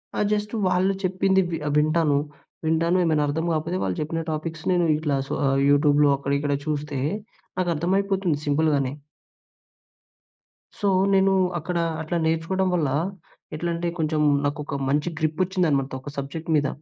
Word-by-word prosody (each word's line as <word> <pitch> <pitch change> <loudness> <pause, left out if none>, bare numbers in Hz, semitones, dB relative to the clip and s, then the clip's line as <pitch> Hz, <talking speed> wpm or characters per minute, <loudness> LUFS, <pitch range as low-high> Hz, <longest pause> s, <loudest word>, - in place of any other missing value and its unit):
ఆ! - - -2
జస్టు 210 +1 -1
వాళ్ళు 185 +2 +2
చెప్పింది 190 +1 +2
వి 165 - -1
ఆహ్, 145 - 0
వింటాను. 155 -1 +3 0.5
వింటాను 165 +3 +2
ఏమైనా 155 -2 +2
అర్థం 160 +3 -1
కాకపోతే, 165 +3 -1
వాళ్ళు 95 -2 -2
చెప్పిన 165 +2 -2
టాపిక్స్ 160 +1 -4
నేను 175 -1 +3
ఇట్లా 150 -3 0
సొ, - - -4
ఆహ్, 135 0 +2
యూట్యూబ్‍లో 145 0 +4
అక్కడ, 140 0 -4
ఇక్కడ 145 0 -1
చూస్తే, 150 -2 -2 0.6
నాకర్థమైపోతుంది 185 0 0
సింపుల్‌గానే. 145 -2 +1 1.9
సో, 205 - 0 0.3
నేను 195 0 +4 0.3
అక్కడ 175 +3 -3 0.2
అట్లా 160 +2 -2
నేర్చుకోవడం 165 +4 0
వల్ల, 155 -5 +1 0.7
ఎట్లంటే 170 +1 -2
కొంచెం, 155 -1 0 0.2
నాకొక 145 -1 -3
మంచి 150 +4 +1
గ్రిప్పోచ్చిందనమాట, 155 -4 0
ఒక 145 - -8
సబ్జెక్ట్ 140 +4 -5
మీద. 145 -1 +1
160 Hz, 135 wpm, -24 LUFS, 145-175 Hz, 1.9 s, యూట్యూబ్‍లో